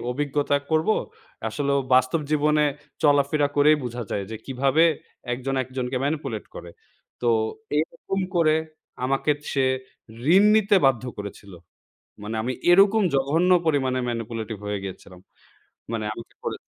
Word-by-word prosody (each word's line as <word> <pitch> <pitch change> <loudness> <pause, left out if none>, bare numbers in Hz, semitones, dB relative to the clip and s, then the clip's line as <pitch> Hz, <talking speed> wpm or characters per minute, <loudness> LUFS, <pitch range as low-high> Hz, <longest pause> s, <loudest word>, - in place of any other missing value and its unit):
অভিজ্ঞতা 145 +2 0
করব। 160 +2 +1 0.6
আসলে 140 -1 -2
ও - - +1
বাস্তব 130 +5 +3
জীবনে 150 0 +3 0.4
চলাফেরা 145 0 +3
করেই 150 +2 +6
বোঝা 120 0 -4
যায় 100 - -2
যে, 110 - -4
কীভাবে 135 +4 +2 0.5
একজন 130 +2 -3
একজনকে 130 0 -4
manipulate 145 -7 -3
করে 85 - -9 0.5
তো 120 - +2 0.5
এইরকম 170 +5 -2 0.2
করে 155 -2 +4 0.5
আমাকে 135 +3 0 0.2
সে 135 -2 +2 0.7
ঋণ 195 - +7
নিতে 205 -1 +4
বাধ্য 125 -2 +2
করেছিল। 100 -1 -8 0.7
মানে 105 +2 -5
আমি 125 +3 -2 0.2
এরকম 200 +4 +6
জঘন্য 150 +7 +2 0.2
পরিমাণে 130 -4 +1
manipulative 115 -2 -4
হয়ে 105 -1 -3
গিয়েছিলাম 95 -1 -9 0.7
মানে 110 -2 -2
আমাকে 115 +1 -11
করে - - -3
135 Hz, 130 wpm, -24 LUFS, 120-155 Hz, 0.7 s, ঋণ